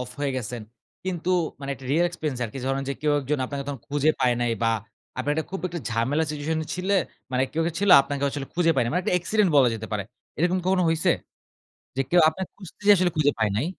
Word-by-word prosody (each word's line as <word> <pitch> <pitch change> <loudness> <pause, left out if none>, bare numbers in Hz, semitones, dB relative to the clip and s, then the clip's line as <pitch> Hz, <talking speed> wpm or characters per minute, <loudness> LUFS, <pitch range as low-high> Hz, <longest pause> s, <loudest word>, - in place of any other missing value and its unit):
Of 125 0 -5
হয়ে 140 -2 0
গেসেন। 120 -1 -4 0.4
কিন্তু 180 -1 -2 0.3
মানে 140 0 -5
একটা 135 - -14
রিয়াল 170 +4 +4
এক্সপেন্স 155 -6 -4
আরকি 115 +4 -6
ধরেন 135 +1 0
যে - - 0
কেউ 150 0 +2
একজন 145 +2 -1
আপনাকে 140 +1 -4
তখন 140 -5 -5
খুঁজে 145 +1 +2
পায় 125 -2 +3
নাই 120 -1 +1
বা 115 - +3 0.5
আপনার 145 +3 0
একটা 160 0 -1
খুব 195 - -4
একটা 170 -2 -5
ঝামেলা 125 +7 +1
সিচুয়েশন 155 +2 -2 0.2
ছিলে 185 +2 0 0.4
মানে 130 +1 +2
কেউ 165 - 0
কী - - +1
ছিল 205 - +3
আপনাকে 140 0 -4
আসলে 140 -1 -5
খুঁজে 170 -1 +3
পায় 130 - +3
নাই 115 - -1
মানে 180 +3 +1
একটা - - +1
অ্যাক্সিডেন্ট 185 +2 +2
বলা 130 -3 +6
যেতে 110 0 -6
পারে। 105 -1 -1 0.4
এরকম 175 +3 +2
কখনো 185 -1 +3
হইসে? 165 -1 +2 0.9
যে 135 - +1
কেউ 175 - +5
আপনাকে 185 +3 -6
খুঁজতে 190 -5 -13
যেয়ে 205 - +8
আসলে 180 0 +2
খুঁজে 145 -1 +4
পায় 110 -1 +2
নাই। 115 +8 0
145 Hz, 230 wpm, -25 LUFS, 130-175 Hz, 0.9 s, যেয়ে